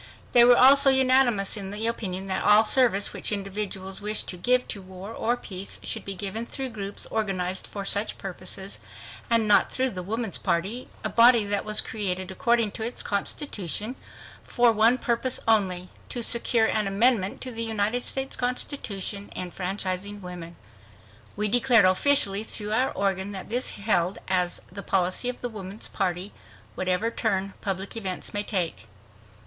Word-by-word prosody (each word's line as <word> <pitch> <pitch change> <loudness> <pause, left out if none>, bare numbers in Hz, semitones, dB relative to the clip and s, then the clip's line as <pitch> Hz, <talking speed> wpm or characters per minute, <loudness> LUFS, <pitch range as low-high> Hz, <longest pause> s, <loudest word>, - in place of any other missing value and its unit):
They 240 - +7
were 245 0 +7
also 275 +2 +8
unanimous 255 -6 +3
in 195 -2 -3
the 210 +3 -3
opinion 195 -5 -2
that 190 -1 -2
all 210 +1 +7
service 220 -5 +4
which - - 0
individuals 195 -1 -3
wished 210 +1 0
to - - -3
give 250 +8 +1
to 200 - -5
war 190 +3 -10
or 240 +2 -1
peace 195 -4 -7
should - - -4
be 195 - -3
given 205 +5 -4
through 265 0 -5
groups 200 -3 -5
organized 190 -4 -2
for 200 -1 -6
such 205 +2 0
purposes, 190 +1 -5 0.5
and 230 -2 +3
not 210 - +4
through 260 0 0
the 185 - -5
Woman's 220 +1 -4
Party, 200 +9 -2 0.2
a - - -1
body 235 -2 +5 0.4
created, 190 -3 -3
according 230 +2 +1
to 220 - -7
its 235 +2 -4
constitution, 210 - -3 0.5
for 240 -1 +3
one 225 +3 +4
purpose 245 +1 0
only—"to 200 +2 -1
secure 235 -1 +3
an 215 -2 0
amendment 200 0 +2
to 255 - -5
the 230 -1 -4
United 225 +2 -1
States 270 0 -3
Constitution 220 -5 -3
enfranchising 185 +2 -4
women." 175 -2 -8 0.8
We 210 +1 0
declared 240 0 +4
officially 200 +1 +3
through 210 -1 -4
our 255 +4 +2
organ 195 0 -2
that 190 - -7
this 245 +3 0
held 195 -3 0
"as 180 -2 0
the 200 +2 -7
policy 190 +5 0
of 250 - -6
the 245 - -3
Woman's 205 -1 -7
Party, 185 +1 -2 0.4
whatever 185 +5 -1
turn 195 -4 -1
public 195 +1 -4
events 190 -5 -4
may 205 - 0
take." 180 - -3
205 Hz, 155 wpm, -25 LUFS, 190-235 Hz, 0.8 s, also